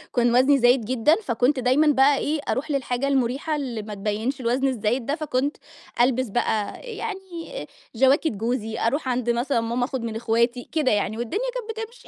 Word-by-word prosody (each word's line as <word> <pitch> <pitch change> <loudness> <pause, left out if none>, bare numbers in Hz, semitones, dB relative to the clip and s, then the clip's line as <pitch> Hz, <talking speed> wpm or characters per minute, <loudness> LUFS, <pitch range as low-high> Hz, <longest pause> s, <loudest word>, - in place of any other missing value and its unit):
كان 240 0 +3
وزني 275 +3 +5
زايد 245 -2 +4
جدًا، 255 +6 +3
فكنت 255 +3 +1
دايمًا 260 +5 +3
بقى 275 0 +5
إيه، 305 +1 -1
أروح 295 +3 -1
للحاجة 265 -1 -1
المُريحة 270 +3 0
اللي 250 -7 -3
ما 210 0 -7
تبيّنش 215 +7 -2
الوزن 255 +3 +1
الزايد 240 0 -1
ده 285 +4 0
فكنت 290 -2 -1 0.4
ألبس 255 0 +2
بقى 215 -1 -1
أ - - -14
يعني 385 -2 -6 0.3
جَواكِت 270 +6 +4
جوزي، 225 +1 -3
أروح 260 +3 0
عند 245 -1 -1
مثلًا 240 +1 +1
ماما 235 +2 -1
آخُد 265 -2 -4
من 225 -1 -4
إخواتي 235 +2 0
كده 305 -5 +1
يعني 210 +1 0
والدنيا 400 - -2
كانت 450 -2 -5
بتمشي. 480 +2 -19
255 Hz, 180 wpm, -24 LUFS, 235-290 Hz, 0.4 s, وزني